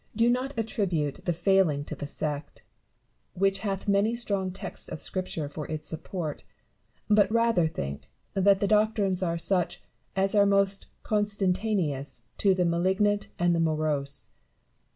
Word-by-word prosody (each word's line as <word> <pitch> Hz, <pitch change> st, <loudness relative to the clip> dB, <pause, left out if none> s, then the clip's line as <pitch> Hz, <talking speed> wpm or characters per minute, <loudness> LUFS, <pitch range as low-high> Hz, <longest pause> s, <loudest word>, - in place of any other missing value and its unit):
Do 230 Hz, +1 st, +4 dB
not 255 Hz, +2 st, -2 dB
attribute 185 Hz, -10 st, -1 dB
the 175 Hz, -, +2 dB
failing 175 Hz, -4 st, +2 dB
to -, -, -6 dB
the 145 Hz, -, -5 dB
sect, 145 Hz, 0 st, -5 dB, 0.7 s
which 195 Hz, +1 st, +2 dB
hath 195 Hz, -1 st, -3 dB
many 200 Hz, +3 st, +3 dB
strong 200 Hz, -5 st, -1 dB
texts 190 Hz, 0 st, -6 dB
of -, -, -5 dB
Scripture 180 Hz, -5 st, -3 dB
for 145 Hz, 0 st, -6 dB
its 155 Hz, -1 st, -5 dB
support; 160 Hz, -1 st, -5 dB, 0.6 s
but 210 Hz, -1 st, +4 dB
rather 230 Hz, -7 st, +3 dB
think 70 Hz, -, -5 dB, 0.2 s
that 195 Hz, 0 st, +4 dB
the 200 Hz, -, +1 dB
doctrines 210 Hz, -3 st, +2 dB
are 170 Hz, -2 st, 0 dB
such 175 Hz, 0 st, 0 dB, 0.4 s
as 195 Hz, +1 st, +1 dB
are 200 Hz, -1 st, +5 dB
most 200 Hz, 0 st, +3 dB, 0.2 s
con 210 Hz, -1 st, +1 dB
sentaneous 185 Hz, -, -1 dB, 0.2 s
to 195 Hz, -2 st, +4 dB
the 180 Hz, -1 st, +2 dB
malignant 190 Hz, +5 st, +1 dB
and 175 Hz, 0 st, +3 dB
morose. 150 Hz, -3 st, -1 dB
190 Hz, 145 wpm, -28 LUFS, 160-205 Hz, 0.7 s, are